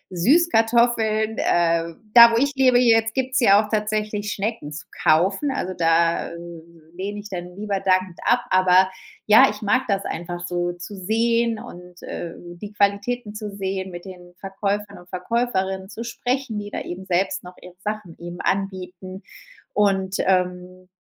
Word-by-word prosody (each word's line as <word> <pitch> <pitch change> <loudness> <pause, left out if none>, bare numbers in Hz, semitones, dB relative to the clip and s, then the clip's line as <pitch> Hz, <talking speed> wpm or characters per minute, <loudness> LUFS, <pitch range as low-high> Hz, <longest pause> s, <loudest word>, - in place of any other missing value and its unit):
Süßkartoffeln. 225 - +2
Äh, 170 -1 +1 0.2
da 235 -1 +10
wo 230 - +2
ich 280 +3 +1
lebe 255 -2 +4
jetzt 225 -2 +3
gibt's 260 0 0
ja 205 -4 +6
auch - - -13
tatsächlich 210 -1 -1
Schnecken 210 -7 -3
zu 150 - -8 0.2
kaufen, 190 - +3
also 185 -9 -3
da, 165 0 +2
äh, 170 - -9 0.6
lehne 200 +3 -5
ich 205 +1 -9
dann 180 -1 -7
lieber 200 -1 -2
dankend 185 -2 0
ab. 240 0 +3
Aber 185 0 +5 0.4
ja, 215 0 +7
ich 210 +1 -7
mag 255 +6 +2
das 200 -1 -1
einfach 175 +1 -5
so 175 0 -2
zu 175 +4 -9
sehen 230 +4 +1
und, 180 -2 -12
äh, 170 -1 -6
die 175 +4 -10
Qualitäten 205 +3 0
zu 210 -1 -6
sehen, 190 -1 -3
mit 175 +1 -9
den 180 -1 -12
Verkäufern 200 0 -3
und 175 0 -17
Verkäuferinnen 190 -1 -2
zu 225 - -7
sprechen, 245 -1 -3
die 205 - -7
da - - -5
eben 185 +2 -7
selbst 185 +1 0
noch 180 0 -11
ihre 180 -1 -12
Sachen 210 -5 -5
eben 175 +1 -8
anbieten 190 -1 -4 0.5
und, 195 -2 +1
ähm, 180 0 -1
195 Hz, 160 wpm, -22 LUFS, 180-220 Hz, 0.6 s, da